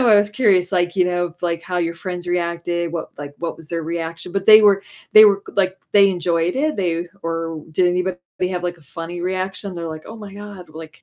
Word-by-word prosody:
of -, -, +3 dB
why 225 Hz, -, +6 dB
I -, -, +8 dB
was 205 Hz, 0 st, +3 dB
curious 200 Hz, -5 st, +2 dB
like, 175 Hz, -1 st, +1 dB
you 185 Hz, -, +4 dB
know, 175 Hz, -1 st, -1 dB
like, 170 Hz, -1 st, -1 dB
how 180 Hz, +1 st, -3 dB
your 170 Hz, -1 st, -1 dB
friends 180 Hz, +1 st, -6 dB
reacted, 170 Hz, -1 st, -1 dB
what 170 Hz, -, -4 dB
like 145 Hz, -1 st, -7 dB
what 170 Hz, -1 st, -4 dB
was 165 Hz, -2 st, -15 dB
their 165 Hz, -1 st, -2 dB
reaction. 165 Hz, +1 st, -4 dB
But 195 Hz, -1 st, -1 dB
they 215 Hz, 0 st, +10 dB
were 200 Hz, -1 st, +5 dB, 0.3 s
they 215 Hz, 0 st, +11 dB
were, 200 Hz, -2 st, +4 dB
like, 190 Hz, -1 st, +2 dB, 0.2 s
they 200 Hz, -1 st, +6 dB
enjoyed 175 Hz, -1 st, 0 dB
it? 305 Hz, +3 st, 0 dB
They 175 Hz, -3 st, -1 dB, 0.2 s
or 165 Hz, -1 st, -3 dB
did 180 Hz, +4 st, +2 dB
anybody 180 Hz, +1 st, 0 dB, 0.3 s
have 180 Hz, -1 st, -3 dB
like 175 Hz, 0 st, -3 dB
a 165 Hz, -, -21 dB
funny 165 Hz, +4 st, -7 dB
reaction? 185 Hz, +1 st, -3 dB
They're 170 Hz, -1 st, -5 dB
like, 155 Hz, -1 st, -7 dB
"Oh 220 Hz, -, -9 dB
my 205 Hz, -3 st, -10 dB
god," 205 Hz, -4 st, -10 dB
like 160 Hz, 0 st, -11 dB
175 Hz, 235 wpm, -20 LUFS, 170-195 Hz, 0.3 s, they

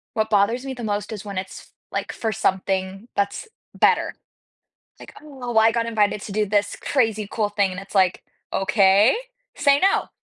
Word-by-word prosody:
what 220 Hz, 0 st, 0 dB
bothers 220 Hz, +6 st, +2 dB
me 270 Hz, -, -4 dB
the 245 Hz, -, -8 dB
most 210 Hz, -1 st, -2 dB
is 210 Hz, -, -7 dB
when 200 Hz, -2 st, -6 dB
it's 185 Hz, 0 st, -5 dB
f -, -, -20 dB, 0.2 s
like, -, -, -3 dB
for 225 Hz, -1 st, -2 dB
something 190 Hz, 0 st, -1 dB
that's 200 Hz, -, -1 dB, 0.3 s
better. -, -, +2 dB, 0.8 s
Like, -, -, -12 dB
"Oh, 260 Hz, -6 st, -5 dB
I 225 Hz, 0 st, +6 dB
got 230 Hz, 0 st, -1 dB
invited 210 Hz, -3 st, +1 dB
to 205 Hz, -, -7 dB
do 215 Hz, 0 st, +1 dB
this 205 Hz, 0 st, 0 dB
crazy 220 Hz, -6 st, 0 dB
cool 210 Hz, -2 st, 0 dB
thing," 200 Hz, -2 st, +1 dB
and 185 Hz, -, -6 dB
it's, 195 Hz, +1 st, -12 dB
like, 185 Hz, -2 st, +2 dB, 0.3 s
"Okay, 195 Hz, +3 st, +4 dB, 0.4 s
say 280 Hz, -1 st, +4 dB
no." 390 Hz, +4 st, +2 dB
210 Hz, 180 wpm, -22 LUFS, 195-230 Hz, 0.8 s, I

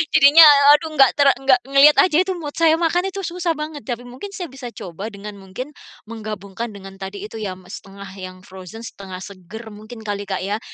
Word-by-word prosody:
Jadinya 290 Hz, +4 st, +8 dB, 0.3 s
aduh 310 Hz, +1 st, +2 dB
nggak 270 Hz, -3 st, +6 dB
ter 285 Hz, -, +5 dB
nggak 265 Hz, -1 st, +3 dB
ngelihat 275 Hz, +2 st, +6 dB
aja 330 Hz, -4 st, +4 dB
itu 380 Hz, -, -4 dB
mood 295 Hz, -4 st, -7 dB
saya, 320 Hz, -1 st, +5 dB
makan 350 Hz, +3 st, +1 dB
itu 395 Hz, -, -6 dB
susah 345 Hz, 0 st, -2 dB
banget, 300 Hz, -3 st, -7 dB
tapi 245 Hz, -1 st, -4 dB
mungkin 265 Hz, +12 st, -9 dB
saya 355 Hz, -3 st, -5 dB
bisa 265 Hz, -2 st, -9 dB
coba, 190 Hz, +2 st, -8 dB
dengan 205 Hz, -1 st, -9 dB
mungkin 195 Hz, +10 st, -8 dB, 0.4 s
menggabungkan, 215 Hz, 0 st, -7 dB
dengan 195 Hz, 0 st, -12 dB
tadi 195 Hz, +1 st, -7 dB
itu 220 Hz, +1 st, -8 dB
ya, 190 Hz, -3 st, -4 dB
m 185 Hz, -, -17 dB
0,5 195 Hz, 0 st, -10 dB
yang 185 Hz, 0 st, -8 dB
frozen 190 Hz, +5 st, -11 dB
0,5 190 Hz, -4 st, -9 dB
seger 200 Hz, +3 st, -11 dB
mungkin 215 Hz, +2 st, -11 dB
kali, 205 Hz, -1 st, -4 dB
Kak, 190 Hz, -2 st, -3 dB
ya. 205 Hz, +3 st, -2 dB
225 Hz, 200 wpm, -20 LUFS, 195-295 Hz, 0.4 s, Jadinya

